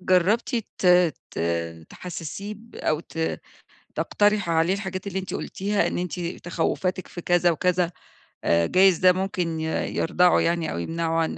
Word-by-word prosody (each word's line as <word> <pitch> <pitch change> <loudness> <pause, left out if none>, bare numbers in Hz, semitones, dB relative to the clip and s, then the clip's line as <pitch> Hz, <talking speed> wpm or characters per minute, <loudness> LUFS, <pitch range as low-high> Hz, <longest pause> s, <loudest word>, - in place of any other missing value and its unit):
جربتِ 185 +5 +2 0.3
ت - - 0 0.4
ت - - -7 0.5
تحسسيه 180 +4 -6
ب 230 +2 -16
أو 155 0 0
ت 165 -1 -3 0.5
تقترحي 205 -3 +1
عليه 165 +3 +3
الحاجات 190 -1 -5
اللي 190 -1 -2
أنتِ 190 0 -5
قولتيها، 200 +1 -1
إن - - -2
أنتِ 180 0 -3
تخوّفاتِك 175 +2 -2
في 175 - -7
كذا 175 0 +3
وكذا 180 +1 +1 0.5
آآ، 85 0 +3
جايز 185 -2 +5
ده 185 0 +6
ممكن 180 -3 -2
ي - - -2 0.3
يردعه 180 +1 +3
يعني 170 -2 0
أو - - -4
يِمنعه 165 - -1
عن 160 - -1
180 Hz, 155 wpm, -25 LUFS, 165-190 Hz, 0.5 s, ده